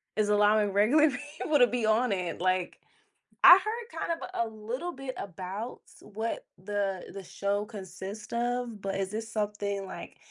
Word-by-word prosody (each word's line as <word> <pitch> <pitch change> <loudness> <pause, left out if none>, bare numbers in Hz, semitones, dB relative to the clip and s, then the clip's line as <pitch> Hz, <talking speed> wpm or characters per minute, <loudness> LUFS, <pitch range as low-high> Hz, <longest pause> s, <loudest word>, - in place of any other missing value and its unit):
is 210 -1 +1
allowing 210 -1 +4
regular 280 +10 +5
people 290 +3 -1
to 245 - +7
be 240 -2 -1
on 220 +2 +3
it, 180 -3 -2
like, 185 -1 0 0.7
I 355 - +12
heard 455 +3 -5
kind 335 - -1
of - - -6 0.2
a - - -5
little 245 +11 -4
bit 265 -1 -6
about 195 +5 -6 0.2
what 220 +2 -4 0.2
the 200 -2 -2
the 195 - -7
show 200 +3 -1
consists 200 0 -8
of, 240 -2 -1
but 195 0 -3
is 195 -1 -2
this 220 +1 -4
something 205 -2 -2
like, 190 - -9
210 Hz, 165 wpm, -29 LUFS, 200-245 Hz, 0.7 s, I